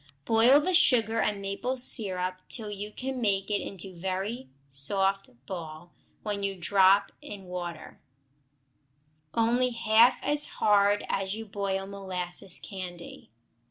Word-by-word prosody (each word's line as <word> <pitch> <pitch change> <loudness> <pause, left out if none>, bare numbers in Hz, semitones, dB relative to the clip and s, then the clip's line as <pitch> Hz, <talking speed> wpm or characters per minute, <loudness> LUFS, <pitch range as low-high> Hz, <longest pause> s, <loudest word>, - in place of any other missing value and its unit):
Boil 230 +5 +5
the 365 +5 -1
sugar 230 -8 +4
and 210 -2 0
maple 240 +7 -3
syrup 185 -6 +1
till 215 -4 -4
you 205 +1 -6
can 260 +3 -5
make 195 -2 0
it 205 - +1
into 195 -1 -6
a - - -13
very 190 +7 -4 0.2
soft 195 +9 -1 0.2
ball 165 0 -8 0.3
when 205 -1 -3
you 200 -1 -2
drop 195 +2 +4
it - - -11
in 200 -2 -10
water; 175 -2 -7 1.4
only 240 +2 +2
half 230 +1 +4
as 295 0 +1
hard 205 0 +3
as 195 +1 -2
you 225 0 -7
boil 195 -1 -3
molasses 190 -2 -4
candy. 180 -3 -8
200 Hz, 135 wpm, -28 LUFS, 185-225 Hz, 1.4 s, Boil